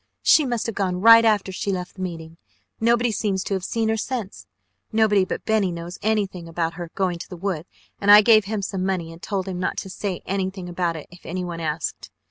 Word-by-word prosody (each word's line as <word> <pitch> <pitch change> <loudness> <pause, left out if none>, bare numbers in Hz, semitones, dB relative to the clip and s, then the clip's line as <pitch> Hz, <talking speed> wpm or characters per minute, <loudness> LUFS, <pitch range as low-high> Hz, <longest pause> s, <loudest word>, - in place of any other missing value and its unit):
She 300 -4 +5
must 240 -3 -1
have 230 - -2
gone 185 -3 -1
right 230 +3 +8
after 210 -4 +2
she 200 +2 -2
left 180 -1 -4
the - - -7
meeting. 165 -3 -6 0.4
Nobody 235 +1 +2
seems 200 -3 -1
to - - -3
have 190 -2 -2
seen 225 +3 -1
her 220 - +1
since. 220 -3 -5 0.4
Nobody 215 -3 +3
but - - -5
Benny 215 -4 +2
knows 170 +1 -7
anything 200 -5 -1
about 165 0 -2
her 175 -1 -7
going 180 -3 -1
to - - -9
the 180 - -8
woods 180 -2 -3 0.3
and 200 - 0
I 210 +1 +11
gave 215 -2 +6
him 210 -1 -3
some 190 -1 -3
money 180 -4 -2
and 165 - -14
told 195 -2 -3
him 185 -2 -4
not 180 - -2
to 190 - -5
say 190 -2 -4
anything 190 -1 -3
about 175 -1 -1
it 155 - -7
if 175 - -15
anyone 175 -1 -4
asked. 160 0 -3
190 Hz, 225 wpm, -23 LUFS, 175-215 Hz, 0.4 s, I